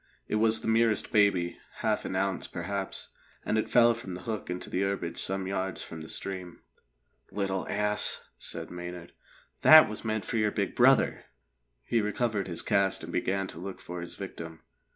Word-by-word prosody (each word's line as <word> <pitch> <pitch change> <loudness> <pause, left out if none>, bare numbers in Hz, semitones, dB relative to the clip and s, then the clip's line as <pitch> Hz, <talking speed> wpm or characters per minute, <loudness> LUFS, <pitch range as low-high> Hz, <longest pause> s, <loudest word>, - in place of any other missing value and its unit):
It 105 - 0
was 110 0 +3
the - - -5
merest 115 -1 +2
baby 100 -6 +2 0.2
half - - 0
an - - -3
ounce, 95 0 0
perhaps 95 +2 -4 0.4
and - - 0
it 110 - 0
fell 120 -1 +6
from 100 -6 -7
the 90 - -9
hook 110 +2 -4
into 90 0 -3
the 90 - -1
herbage 100 -4 -2
some 95 0 -1
yards 95 -1 -2
from 80 - -8
the 80 - -9
stream. 90 -3 -4 0.7
"Little 95 -2 -2
ass!" 105 0 +1
said - - -5
Maynard. 90 -1 -7 0.5
"That 155 0 +10
was 110 - -6
meant 110 -2 -2
for 115 - -2
your 110 -1 +3
big - - -2
brother." - - +4 0.6
He 115 - +1
recovered 105 -1 -1
his 85 -2 -2
cast 100 -3 +2
and 85 +1 -7
began 95 +2 0
to - - -9
look 95 +2 -7
for 90 0 -7
his 85 - -8
victim. 85 -4 -8
95 Hz, 180 wpm, -29 LUFS, 90-105 Hz, 0.7 s, That